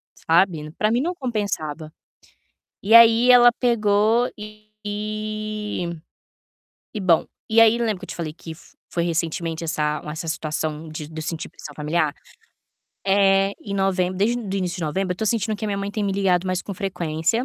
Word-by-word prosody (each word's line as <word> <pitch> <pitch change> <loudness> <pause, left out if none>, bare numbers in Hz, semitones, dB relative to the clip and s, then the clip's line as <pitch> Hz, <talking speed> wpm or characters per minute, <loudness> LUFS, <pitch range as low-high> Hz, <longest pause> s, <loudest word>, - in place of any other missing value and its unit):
sabe. 165 -3 +1
Pra 215 - +2
mim 240 +3 +1
não 345 +5 -1
compensava, 200 - -3 0.9
e 210 +3 +2
aí 230 +1 +8
ela 240 -1 +8
pegou 225 0 +2
e 215 0 -10 2.3
e 215 - -4
bom, 175 -4 +3 0.2
e 225 +1 +4
aí 225 +1 +6
lembra 220 -4 -1
que 190 - -8
eu - - -13
te - - -6
falei 160 -3 -4
que 165 +1 -11
f - - -20 0.2
foi 170 -1 0
recentemente 165 -1 -2
essa 150 -2 -1
uma 150 - -8
essa 160 +1 -6
situação 155 -1 -3
de 155 -1 -7
do 160 0 -7
sentir 165 0 -4
pressão 150 - -11
familiar? 155 0 0 0.9
Eh, 195 0 +4
em 200 - -6
novembro 185 -2 0
desde 235 +5 +1
do 200 -2 -3
início 180 -2 -2
de - - -4
novembro, 180 +4 -1
eu - - -10
tô 220 - -2
sentindo 220 -1 0
que 215 - -6
a - - -3
minha 200 - -1
mãe 200 0 -3
tem 210 +1 -3
me 200 -1 0
ligado 190 -2 +1
mais 185 0 -1
com 200 - -6
frequência 180 +2 -1
195 Hz, 180 wpm, -22 LUFS, 165-215 Hz, 2.3 s, aí